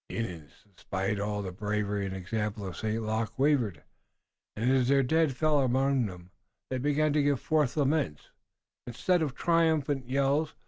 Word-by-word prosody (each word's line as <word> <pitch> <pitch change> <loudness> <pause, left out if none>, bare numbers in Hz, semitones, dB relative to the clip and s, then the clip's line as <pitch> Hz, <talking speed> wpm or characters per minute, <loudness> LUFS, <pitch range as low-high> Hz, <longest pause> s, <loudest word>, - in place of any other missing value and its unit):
The - - -5
Indians, 85 -10 -6
despite 95 +2 -2
all 105 0 -2
the 95 - -4
bravery 105 +1 -2
and 95 - -5
example 105 +2 -3
of 95 -3 -6
St. 110 +3 -2
Luc, 110 0 -2
wavered, 130 - +1 0.7
and, 115 +4 +1
as 130 -2 +3
their 135 0 +4
dead 160 +2 +2
fell 155 -1 +3
around 130 -1 +2
them, 90 -1 -11 0.4
they 130 - -1
began 145 +2 +1
to 150 - +3
give 140 -2 +2
forth 150 -3 0
laments, 140 - 0 0.6
instead 170 +9 +1
of 145 -4 -2
triumphant 155 -6 +1
yells. 140 +3 +1
125 Hz, 165 wpm, -29 LUFS, 105-145 Hz, 0.7 s, their